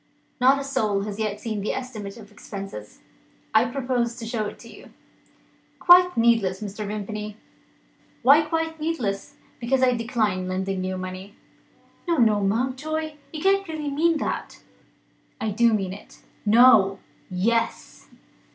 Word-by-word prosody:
Not 260 +2 +5
a 275 - -3
soul 215 -7 0
has 205 0 -6
yet 210 -1 -2
seen 215 -2 -4
the 205 - -2
estimate 220 -5 -6
of 215 -2 -13
expenses. 195 - -9 0.5
I 220 +2 +5
propose 245 -2 -1
to 235 -2 -7
show 225 -2 -2
it - - -8
to - - -14
You." - - -14 0.9
"Quite 360 -2 +6
needless, 225 -5 +3
Mr. 210 0 -6
Vimpany." 210 0 -5 0.9
"Why 285 +4 +7
quite 320 +1 -2
needless?" 285 -6 -3 0.2
"Because 255 +2 +1
I 250 -1 +4
decline 220 -6 -1
lending 190 0 -2
you 185 0 -2
the - - -4
money." 185 +3 -7 0.7
"No, 340 -1 +1
no, 220 -4 +4
Mountjoy! 275 +9 -2
You 310 -2 -6
can't 390 0 +3
really 305 -3 -4
mean 325 +3 +2
that?" - - -4 0.8
"I 220 - -2
do 235 +3 +3
mean 195 -4 -1
it." 200 - -13 0.3
"No!" 215 -4 +6 0.3
"Yes!" 230 +5 -1
230 Hz, 145 wpm, -24 LUFS, 200-270 Hz, 0.9 s, Why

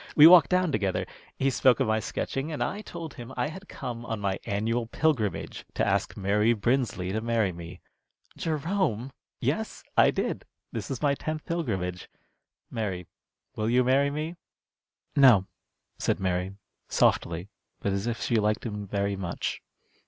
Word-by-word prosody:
We 150 - +9
walked 170 -2 +9
down 180 -2 +2
together. 100 -6 0 0.3
He 135 0 +2
spoke 130 0 +4
about 135 - +2
my 110 0 +2
sketching, 135 +7 -3
and 150 - -1
I 205 - -3
told 170 -6 -7
him 120 -1 -9
I 125 +4 0
had 190 +5 -10
come 120 -1 -5
on 115 -2 -3
my 100 -1 -1
annual 115 +3 0
pilgrimage, 125 -7 0
to - - +2
ask - - 0
Mary 105 +3 +3
Brinsley 115 -5 0
to 110 +2 -1
marry 115 -4 +1
me." 85 0 -9 0.5
"Jerome!" 155 - -1 0.3
"Yes, - - -2
I - - +6
did. - - -2 0.3
This - - -5
is 135 +1 -4
my 145 -1 +4
tenth 155 +2 -4
pilgrimage. 95 - -2 0.6
Mary, 95 -6 -3 0.5
will 110 +1 -1
you 125 +2 +4
marry 135 +3 +3
me?" 155 +4 -4 0.8
"No," 120 -9 +7 0.5
said - - 0
Mary, 95 0 -1 0.4
softly, 85 +3 +2 0.3
but 100 - -1
as 100 +3 -1
if 115 -1 -2
she 120 - +2
liked 105 +2 +1
him 105 -3 -4
very 100 0 -1
much. 90 -3 -3
115 Hz, 160 wpm, -28 LUFS, 100-140 Hz, 0.8 s, We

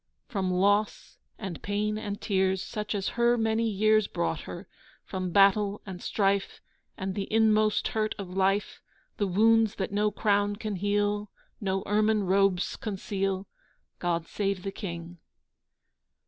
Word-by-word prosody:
From 195 -5 -1
loss 205 +3 +1 0.2
and 190 -6 -6
pain 210 +1 -1
and 205 -1 -4
tears 190 -1 +1
Such 210 0 -4
as 195 -2 -1
her 235 0 +2
many 225 0 +1
years 215 0 +3
Brought 85 -1 -2
her; - - -8 0.4
from 185 -1 -3
battle 200 +2 +4
and 185 -2 -7
strife, 200 -1 0 0.4
And 190 0 -3
the 195 0 -4
inmost 215 -1 +3
hurt 215 -1 -1
of 200 - -6
life, 195 +2 +1 0.4
The 205 - 0
wounds 225 +3 +4
that 190 - -3
no 210 +1 +2
crown 205 0 +1
can 210 -2 -4
heal, 205 +1 0 0.3
No 195 -2 -1
ermine 215 +1 +2
robes 190 -1 +2
conceal, 195 -2 -2 0.5
God 170 -2 -1
save 195 -1 -2
the 195 - -3
King! 170 -3 -7
205 Hz, 140 wpm, -28 LUFS, 190-215 Hz, 0.5 s, battle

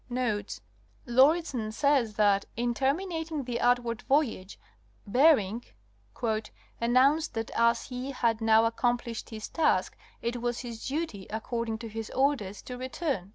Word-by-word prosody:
Notes.—Lauridsen 245 - 0
says* 255 -3 +2
that, 200 -1 +3
in 240 0 0
terminating 320 +3 -1
the 245 -1 -3
outward 245 -1 +1
voyage, 250 -9 0 0.5
Bering 235 -2 +3 0.5
''announced 240 +6 0
that 225 0 -4
as 235 0 +2
he 255 +1 -6
had 235 -4 0
now 225 0 +5
accomplished 235 0 -1
his 215 -1 -6
task 325 - +1 0.2
it 235 +1 -3
was 240 0 -2
his 235 -3 -7
duty, 270 - -3
according 225 +1 -3
to 230 0 -7
his 220 0 -6
orders, 260 -8 0
to 250 -1 -7
return." 260 - -3
240 Hz, 125 wpm, -29 LUFS, 220-270 Hz, 0.5 s, now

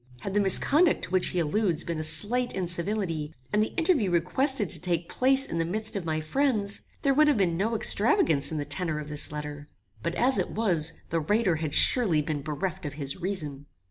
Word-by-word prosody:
Had 195 - -5
the 205 - +2
misconduct 290 - +3
to - - -2
which 185 -1 +1
he - - -3
alludes 175 +1 +1
been 170 -2 -4
a - - -4
slight 245 +9 +1
incivility, 170 -3 -3 0.2
and 210 - +2
the 215 - -3
interview 320 - +1
requested 205 - +2
to - - -4
take 170 -2 -2
place 270 +1 +2
in 165 - -4
the - - +1
midst 215 +6 -3
of 195 -4 -4
my 155 -1 -2
friends, 210 - +1 0.2
there 275 - +2
would 305 +2 +3
have 295 -5 +2
been 180 -4 0
no 215 +6 -1
extravagance 205 - +2
in 160 - -4
the 145 - -3
tenor 155 +2 -3
of 150 0 -8
this 150 -1 -1
letter; 150 -1 -7 0.3
but, 170 0 -4
as 260 +2 +1
it - - -2
was, 170 -8 -1 0.2
the 165 - 0
writer 190 +1 0
had 155 -2 -2
surely 205 -12 +5
been 150 -1 -3
bereft 155 +4 -5
of 145 - -6
his 140 -2 -5
reason. 150 -7 -4
180 Hz, 210 wpm, -26 LUFS, 155-220 Hz, 0.3 s, surely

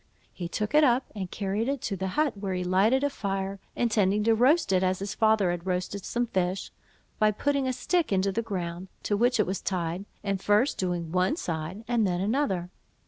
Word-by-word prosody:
He 175 - -5
took 210 +4 -3
it 305 +1 +6
up 255 -1 +3
and 190 -4 -5
carried 205 +5 -2
it 280 0 -1
to 200 - -2
the 190 0 -3
hut, 300 -6 +2
where 195 -2 -3
he 180 - -1
lighted 200 +9 +3
a 285 - +2
fire, 195 -4 -3 0.2
intending 210 -3 +2
to 225 +1 +4
roast 255 - +3
it 185 - +3
as 185 0 +1
his 200 +1 -4
father 215 -4 +3
had 175 +1 -5
roasted 185 +2 -2
some 240 0 0
fish, 185 -3 -2 0.5
by 215 - +5
putting 275 +5 0
a - - +1
stick 315 +6 0
into 195 0 +2
the 230 - -1
ground, 180 -4 -4 0.2
to 205 - +1
which 245 +3 +2
it 210 - +4
was 190 0 -3
tied, 180 0 -2 0.2
and 195 -2 -1
first 210 +8 +2
doing 175 -3 -2
one 185 - +2
side 170 - -4
and 235 -4 +2
then 175 -1 -1
another. 195 -4 0
200 Hz, 210 wpm, -27 LUFS, 185-235 Hz, 0.5 s, it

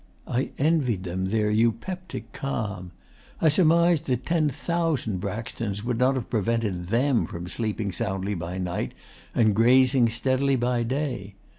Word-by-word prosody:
I 125 +3 -1
envied 135 - +1
them 95 +1 -2
their 105 +2 +1
eupeptic 115 - -1
calm. 100 -9 -4 0.5
I 160 - +4
surmised 170 0 +4
that 125 -1 -1
ten 165 -3 +2
thousand 150 - -1
Braxtons 105 0 -4
would 120 -1 -1
not 130 +2 +3
have 130 - -3
prevented 110 -5 -1
THEM 120 +4 +2
from 85 +1 -7
sleeping 110 0 -2
soundly 95 -2 -2
by 85 0 -4
night 90 -1 -3 0.4
and 110 -3 +3
grazing 125 +2 +5
steadily 130 +4 +1
by 120 -1 +1
day. 120 -6 -3
115 Hz, 140 wpm, -26 LUFS, 100-135 Hz, 0.5 s, grazing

